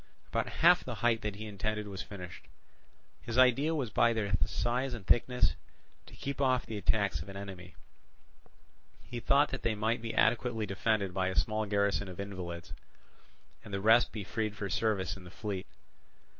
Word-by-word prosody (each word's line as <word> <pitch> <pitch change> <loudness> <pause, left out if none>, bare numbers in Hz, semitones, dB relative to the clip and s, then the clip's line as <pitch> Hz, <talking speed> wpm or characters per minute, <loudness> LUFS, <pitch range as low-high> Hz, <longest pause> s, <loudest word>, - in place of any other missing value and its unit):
About - - -1
half - - +5
the - - -5
height 115 -1 +3
that 105 -3 -3
he 110 +2 -7
intended 105 +1 -3
was 95 -2 -5
finished. 90 -4 -9 0.7
His 120 0 -4
idea 135 +5 +5
was 130 -8 -2
by 120 0 +4
their 105 -3 -2
size 125 +3 -1
and 105 -5 -9
thickness 125 +3 +3 0.5
to - - -13
keep 140 0 -4
off 130 -2 +2
the 110 - -6
attacks 100 -6 +1
of 95 - -8
an 95 - -7
enemy; 95 -3 -8 1.3
he 120 - -6
thought 140 +5 +4
that 135 - -4
they 115 -2 0
might 110 +3 0
be 115 -1 -4
adequately 115 -2 +2
defended 100 -1 0
by 95 0 0
a 95 - -2
small 110 0 +1
garrison 100 0 +1
of 90 0 -9
invalids, 90 -4 -6 0.9
and - - -11
the 100 - -1
rest 110 +4 +5
be 105 - -5
freed 110 +1 -2
for 100 -2 -4
service 105 -5 0
in 95 - -12
the 90 - -11
fleet. 100 -1 -5
105 Hz, 180 wpm, -32 LUFS, 100-120 Hz, 1.3 s, half